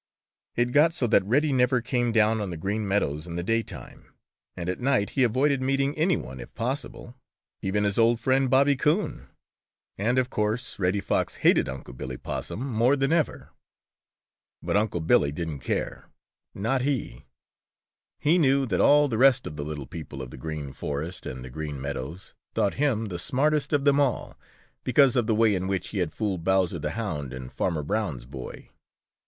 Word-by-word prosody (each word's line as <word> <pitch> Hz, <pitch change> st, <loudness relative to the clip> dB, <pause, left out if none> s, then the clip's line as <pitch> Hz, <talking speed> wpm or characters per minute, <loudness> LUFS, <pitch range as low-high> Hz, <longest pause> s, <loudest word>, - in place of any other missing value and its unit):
It 120 Hz, +1 st, +1 dB
got 155 Hz, +5 st, +4 dB
so 130 Hz, -, 0 dB
that 110 Hz, -, +4 dB
Reddy 140 Hz, +7 st, +2 dB
never 125 Hz, 0 st, +3 dB
came 120 Hz, 0 st, 0 dB
down 110 Hz, 0 st, +3 dB
on 100 Hz, -, -3 dB
the 85 Hz, -, -5 dB
Green 100 Hz, +5 st, -2 dB
Meadows 80 Hz, -6 st, 0 dB
in 85 Hz, -, -6 dB
the 85 Hz, -, -2 dB
daytime, 115 Hz, +4 st, -4 dB, 0.5 s
and 85 Hz, -, -4 dB
at 90 Hz, -, -2 dB
night 125 Hz, -5 st, +1 dB
he 135 Hz, -, 0 dB
avoided 130 Hz, +3 st, +2 dB
meeting 135 Hz, +2 st, +1 dB
any 165 Hz, +3 st, +2 dB
one 65 Hz, +1 st, -8 dB
if -, -, -9 dB
possible, 125 Hz, 0 st, -4 dB, 0.5 s
even 105 Hz, +2 st, 0 dB
his 100 Hz, +1 st, 0 dB
old 115 Hz, 0 st, +4 dB
friend, 130 Hz, +2 st, +2 dB
Bobby 140 Hz, +2 st, +4 dB
Coon. 160 Hz, +9 st, 0 dB, 0.7 s
And 120 Hz, +5 st, +1 dB
of 130 Hz, 0 st, +1 dB
course 110 Hz, +3 st, -2 dB
Reddy 95 Hz, +2 st, +1 dB
Fox -, -, -1 dB
hated -, -, +5 dB
Unc' 65 Hz, -2 st, -8 dB
Billy 65 Hz, 0 st, -6 dB
Possum 120 Hz, -, -5 dB
more 120 Hz, +2 st, +3 dB
than 135 Hz, +2 st, +1 dB
ever. 165 Hz, -3 st, -1 dB, 1.1 s
But -, -, -1 dB
Unc' 105 Hz, -6 st, 0 dB
Billy 70 Hz, -2 st, +4 dB
didn't 80 Hz, -2 st, -4 dB
care, 65 Hz, -, -3 dB, 0.5 s
not 125 Hz, +7 st, 0 dB
he! 130 Hz, -, -2 dB, 0.9 s
He 165 Hz, +5 st, +3 dB
knew 135 Hz, -3 st, +3 dB
that 95 Hz, -8 st, 0 dB
all 145 Hz, 0 st, +6 dB
the 115 Hz, -5 st, -2 dB
rest 135 Hz, -1 st, +5 dB
of 75 Hz, -, -6 dB
the 75 Hz, -, -4 dB
little 75 Hz, -2 st, -5 dB
people 70 Hz, -3 st, -7 dB
of -, -, -9 dB
the -, -, -9 dB
Green 75 Hz, -1 st, -5 dB
Forest 75 Hz, +5 st, -5 dB
and 65 Hz, 0 st, -6 dB
the 65 Hz, -, -9 dB
Green 75 Hz, 0 st, -5 dB
Meadows 70 Hz, +5 st, -6 dB, 0.2 s
thought 100 Hz, -, +2 dB
him 130 Hz, -6 st, 0 dB
the 90 Hz, -5 st, -5 dB
smartest 145 Hz, -, +1 dB
of 145 Hz, -2 st, +1 dB
them 140 Hz, 0 st, +4 dB
all, 135 Hz, -5 st, 0 dB, 0.5 s
because 130 Hz, 0 st, +4 dB
of 120 Hz, -3 st, +2 dB
the 110 Hz, -, +2 dB
way 110 Hz, -1 st, +4 dB
in 95 Hz, -1 st, -1 dB
which 95 Hz, -2 st, -2 dB
he 100 Hz, -, -3 dB
had 90 Hz, -4 st, 0 dB
fooled 100 Hz, -6 st, -2 dB
Bowser 95 Hz, -2 st, +2 dB
the 75 Hz, +6 st, -4 dB
Hound 75 Hz, -, -3 dB
and 65 Hz, 0 st, -8 dB
Farmer 80 Hz, -5 st, -1 dB
Brown's 80 Hz, -, -2 dB
boy. 65 Hz, -1 st, -9 dB
110 Hz, 185 wpm, -26 LUFS, 80-130 Hz, 1.1 s, all